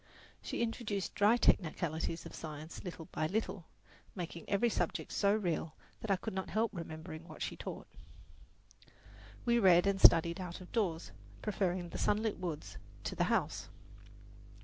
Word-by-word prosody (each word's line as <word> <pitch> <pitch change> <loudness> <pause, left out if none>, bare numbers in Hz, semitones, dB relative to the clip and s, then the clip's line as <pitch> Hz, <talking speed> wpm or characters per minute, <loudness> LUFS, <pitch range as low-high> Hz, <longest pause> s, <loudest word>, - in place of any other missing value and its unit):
She - - -2
introduced 215 -5 -2
dry 210 +4 +5
technicalities 165 -5 +1
of - - -8
science 155 0 -7
little 170 -3 -6
by 155 - 0
little, 200 -3 -2 0.5
making 170 -2 -6
every 200 +4 +3
subject 230 - -1
so 200 -1 +3
real 165 -6 -1 0.2
that 220 - -6
I 195 - +5
could 185 - -5
not 190 0 -3
help 220 +1 +1
remembering 160 -1 -7
what - - -6
she - - -3
taught. - - -6 1.6
We 235 -1 +4
read 180 -4 +6
and 195 -1 +1
studied 170 +2 +7
out 175 -1 -5
of 185 - -12
doors, 180 -8 0 0.3
preferring 185 -4 0
the - - -5
sunlit 215 -1 +1
woods 150 - -4 0.3
to - - -3
the - - +2
house. - - 0
180 Hz, 150 wpm, -34 LUFS, 165-205 Hz, 1.6 s, studied